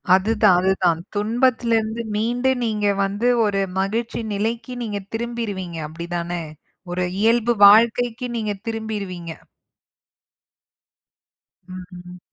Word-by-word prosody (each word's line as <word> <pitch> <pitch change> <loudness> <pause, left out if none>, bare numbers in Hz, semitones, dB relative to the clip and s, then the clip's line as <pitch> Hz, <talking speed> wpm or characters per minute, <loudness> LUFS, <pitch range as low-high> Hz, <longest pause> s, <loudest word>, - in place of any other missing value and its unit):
அதுதான் 210 -1 +3
அதுதான். 185 -3 +2 0.2
துன்பத்துலருந்து 230 0 +1
மீண்டு 240 +4 0
நீங்க 210 -2 0 0.2
வந்து 205 +5 -1 0.2
ஒரு 200 -1 0 0.2
மகிழ்ச்சி 225 +4 -2
நிலைக்கு 230 +4 -2
நீங்க 205 -2 -3 0.2
திரும்பிருவீங்க 215 -7 -4
அப்டி 170 +2 -8
தானே! 170 0 -3 0.5
ஒரு 180 0 -1 0.2
இயல்பு 235 +2 +3
வாழ்க்கைக்கு 235 +3 +4
நீங்க 215 -2 -2 0.2
திரும்பிருவீங்க. 205 -6 -4 2.4
ம். 180 -1 -10
210 Hz, 90 wpm, -22 LUFS, 185-230 Hz, 2.4 s, வாழ்க்கைக்கு